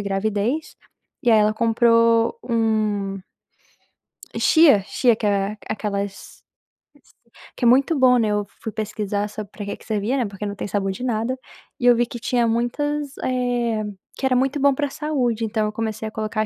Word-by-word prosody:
gravidez, 205 +8 -2 0.5
e, 240 - +3
aí, 220 - +6
ela 210 0 +3
comprou 230 - +3
um 215 -4 0 1.2
chia, 305 -11 +6
chia 240 -3 +3
que 215 - -4
é 200 +1 0
aquelas 200 -2 -2
s - - -14 1.2
que - - -1
é - - +6
muito 270 +6 +4
bom, 250 -1 +6
né, 220 -2 +1
eu 210 0 0 0.2
fui 220 - -4
pesquisar 210 -1 -3
sobre, 210 -1 -8
para 205 - -7
que 200 - -4
que - - -19
servia, 220 +4 -1
né, 250 - +1
porque 200 0 -6
não 205 0 -4
tem - - -5
sabor 195 -1 -1
de 190 +6 -7
nada, 245 +1 -1 0.4
e 245 - -2
eu 245 -1 +7
vi 240 +1 +2
que 240 - -8
tinha 245 -1 +1
muitas 285 +5 -1
eh, 245 -3 0 0.3
que - - -3
era 260 -1 +3
muito 270 +3 +1
bom 280 0 +4
para 290 +1 -1
saúde. 255 -7 -1
Então 215 0 -1
eu - - -3
comecei 220 0 -3
a 215 - -7
colocar 215 0 -2
225 Hz, 180 wpm, -22 LUFS, 210-250 Hz, 1.2 s, eu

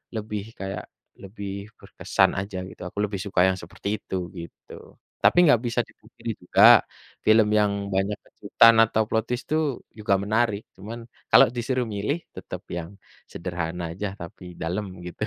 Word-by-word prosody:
lebih 105 -1 -3 0.2
kayak 95 0 -4 0.4
lebih 100 0 -7
berkesan - - +1
aja 100 -1 -5
gitu. - - -14
Aku 100 - -28
lebih 100 -2 -5
suka 95 -3 +1
yang 95 0 +1
seperti 100 +5 -4
itu, 95 - -6 0.2
gitu. 85 -1 -11 0.5
Tapi - - +5
enggak 145 -8 +6
bisa 115 - -1
dipungkiri - - -8
juga, - - +3 0.6
film 110 0 +6
yang 105 -1 +3 0.2
banyak 95 +2 0
kejutan 115 0 +4
atau 110 0 +1
plot 110 -1 +1
twist 125 +1 -2
itu 155 - +3 0.4
juga 105 -2 +2
menarik, 110 0 +1
cuman 110 +5 -8 0.3
kalau - - +8
disuruh 125 +1 -1
milih, 140 +12 -2
tetap - - -7
yang 85 -1 -4 0.4
sederhana 85 -1 -4
aja, 100 +4 -4
tapi 85 +1 -10
dalem 95 +6 -2 0.2
gitu. 90 +4 -6
100 Hz, 155 wpm, -25 LUFS, 95-110 Hz, 0.6 s, kalau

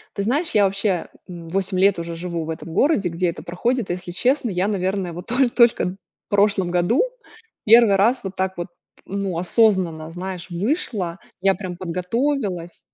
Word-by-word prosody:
Ты 200 - -1
знаешь, 290 - 0
я 210 - +4
вообще, 195 -2 0 0.2
м, 170 -2 -9
8 190 +1 -1
лет 195 -1 +4
уже 170 0 -5
живу 170 -1 -4
в - - -7
этом 160 0 -6
городе, 215 - +2
где 170 +2 -1
это 170 - -7
проходит. 230 +6 -1
Если 180 0 -4
честно, 250 +7 +1
я, 185 +1 0
наверное, 190 -2 -1
вот 175 +2 -8
то 250 +1 +2
только 235 -6 +3
в - - -26 0.3
прошлом 200 -3 +2
году 180 - +2 0.6
1 225 -1 +7
раз 215 +6 +2
вот 190 0 -5
так 190 0 -2
вот, 175 - -3 0.4
ну, 195 -3 -3
осознанно, 180 -5 +2
знаешь, 180 +1 -6
вышла. 195 - -2 0.2
Я 195 +1 +3
прям 185 -3 -6
подготовилась. 185 - -2
190 Hz, 170 wpm, -22 LUFS, 175-215 Hz, 0.6 s, 1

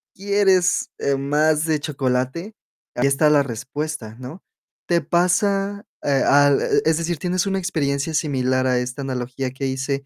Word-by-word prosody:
quieres, 195 -2 +2
eh, 140 -1 0
más 150 +3 +1
de 155 -2 +1
chocolate, 140 - -2 0.4
ahí 125 +3 +2
está 145 +2 +3
la 145 -2 +4
respuesta, 130 -1 -5
¿no? 150 +9 -9 0.5
¿Te 170 -1 +2
pasa, 195 +4 +1 0.2
eh, 140 -2 +2
al? 145 0 +4 0.2
Es 160 0 +3
decir, 170 0 -2
¿tienes 180 +4 -1
una 195 0 0
experiencia 155 -4 -1
similar 130 -4 0
a 125 -1 +2
esta 125 +3 -4
analogía 130 0 -4
que 135 +1 -5
hice, 135 +1 -3
145 Hz, 150 wpm, -21 LUFS, 130-175 Hz, 0.5 s, la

